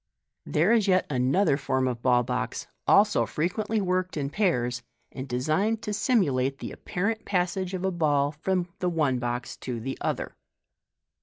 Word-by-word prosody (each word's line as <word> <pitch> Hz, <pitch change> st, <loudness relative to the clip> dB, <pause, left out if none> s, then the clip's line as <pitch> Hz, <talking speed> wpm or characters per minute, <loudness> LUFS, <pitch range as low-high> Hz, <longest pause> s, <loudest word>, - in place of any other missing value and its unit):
There 170 Hz, +8 st, +2 dB
is 225 Hz, -3 st, +3 dB
yet 185 Hz, -1 st, +3 dB
another 135 Hz, +5 st, +2 dB
form 130 Hz, -2 st, 0 dB
of 120 Hz, -2 st, -3 dB
ball 125 Hz, -1 st, +3 dB
box, 125 Hz, 0 st, -3 dB, 0.2 s
also 210 Hz, +1 st, +4 dB
frequently 215 Hz, +7 st, -1 dB
worked 185 Hz, -2 st, -1 dB
in 140 Hz, -1 st, -2 dB
pairs, 125 Hz, -, 0 dB, 0.3 s
and 130 Hz, 0 st, -6 dB
designed 155 Hz, -, 0 dB
to 210 Hz, -, -3 dB
simulate 140 Hz, -, +1 dB
the -, -, -6 dB
apparent 220 Hz, +5 st, -3 dB
passage 185 Hz, 0 st, -1 dB
of 185 Hz, +1 st, -3 dB
a 190 Hz, -, +1 dB
ball 145 Hz, -4 st, +1 dB
from 175 Hz, +4 st, -1 dB
the 180 Hz, -, +1 dB
one 150 Hz, -7 st, +1 dB
box 120 Hz, 0 st, -3 dB
to 125 Hz, -3 st, -5 dB
the 135 Hz, +4 st, -5 dB
other. -, -, -2 dB
155 Hz, 160 wpm, -27 LUFS, 130-190 Hz, 0.3 s, also